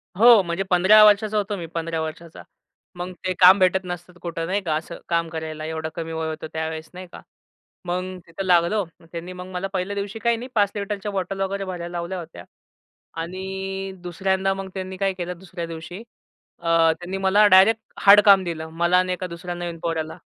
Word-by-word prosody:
हो, 230 +1 +7
म्हणजे 170 +2 -2
15 190 +4 +7
वर्षाचा 210 +1 +4
होतो 205 0 -1
मी 170 - -6
15 165 -1 -2
वर्षाचा. 160 +1 -7 0.5
मग 175 +1 -5
ते 185 - +1
काम 185 +2 +8
भेटत 185 0 +4
नसतात 175 0 -7
कुठं 165 -1 -4
नाही 195 +3 0
का 155 -3 0
असं 160 +2 -5
काम 170 -1 +1
करायला, 160 -1 -5
एवढं 160 0 -4
कमी 165 -1 -5
वय 160 0 -3
होतं 160 0 -6
त्यावेळेस, 160 0 -4
नाही 185 0 -9
का. - - -11 0.6
मग 185 +1 -3
तिथं 165 +4 -6
लागलो. 180 +4 +3 0.3
त्यांनी 170 +2 -6
मग 180 0 -8
मला 185 +1 -3
पहिल्या 190 +2 -2
दिवशी 200 +2 -4
काही 235 +1 +1
नाही 245 +2 -7
5 205 -2 +3
लिटरच्या 205 0 -4
बॉटल 195 0 -3
वगैरे 195 +1 -2
भरायला 175 -2 -6
लावल्या 175 +2 -4
होत्या 165 -1 -10 0.8
आणि 190 +2 -5
दुसऱ्यांदा 190 +2 0
मग 195 0 -6
त्यांनी 190 -1 -6
काय 195 -1 0
केलं 180 -1 -5
दुसऱ्या 185 -2 -7
दिवशी 165 +5 -8 0.6
अ, 170 - -7 0.3
त्यांनी 180 +2 -5
मला 195 +2 +5
डायरेक्ट 195 +4 +6 0.2
हार्ड 205 +1 +9
काम 195 -2 +7
दिलं. 160 -2 -5
मला 170 +2 +2
आणि 185 0 0
एका 180 0 -4
दुसऱ्या 175 +1 -6
नवीन 175 -1 -5
पोर्याला. 160 -1 -3
180 Hz, 190 wpm, -23 LUFS, 170-195 Hz, 0.8 s, हार्ड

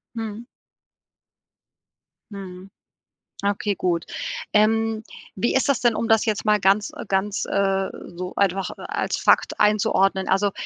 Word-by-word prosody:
Mhm. 225 +1 -5 1.9
Mhm. 190 -1 -9 0.8
Okay, 205 0 0
gut. 175 -2 -1 0.5
Ähm, 220 +1 +2 0.3
wie 220 +5 0
ist 265 - +2
das 275 -1 +2
denn, 240 -3 +2
um 230 - -1
das 225 0 +3
jetzt 215 0 -1
mal 210 -1 +3
ganz 200 +2 +2
äh, - - -6
ganz, 195 +1 0
äh, 195 -1 +1 0.3
so 180 +1 -6
einfach 195 -1 +1
als - - -2
Fakt - - +2
einzuordnen? 195 -2 +2
Also 195 +1 +2
200 Hz, 130 wpm, -23 LUFS, 190-220 Hz, 1.9 s, das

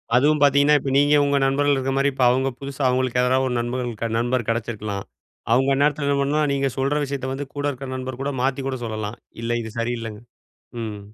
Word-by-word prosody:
அதுவும் 150 +4 +3
பாத்தீங்கன்னா, 145 +1 +5
இப்ப 135 - -4
நீங்க 145 +1 +4
உங்க 140 0 +2
நண்பர்கள் 145 +1 +2
இருக்குறமாரி, 135 +1 +1
இப்ப 130 - 0
அவுங்க 130 +2 +2
புதுசா 140 0 -5
அவுங்களுக்கு 125 -1 +1
யாராவது 130 +1 +2
ஒரு 125 - -2
நண்பர்கள் 120 +1 -2
க 115 - 0
நண்பர் 120 0 0
கெடச்சிருக்கலாம். 110 -3 -3 0.5
அவுங்க 135 +3 +3
அந்நேரத்துல 145 +1 +1
என்ன 140 0 +2
பண்ணலாம், 150 +2 +1
நீங்க 135 0 +1
சொல்ற 135 +2 +1
விஷயத்த 135 -1 -4
வந்து 140 +1 -5
கூட 145 0 -2
இருக்க 130 -1 -7
நண்பர்கூட 130 +2 -4
மாத்திக் 135 +1 0
கூட 130 - -3
சொல்லலாம். 110 0 -4 0.2
இல்லை. 120 +1 0
இது 110 - -7
சரியில்லங்க. 115 -2 -3 0.6
ம். 105 -2 -5
130 Hz, 190 wpm, -23 LUFS, 120-140 Hz, 0.6 s, பாத்தீங்கன்னா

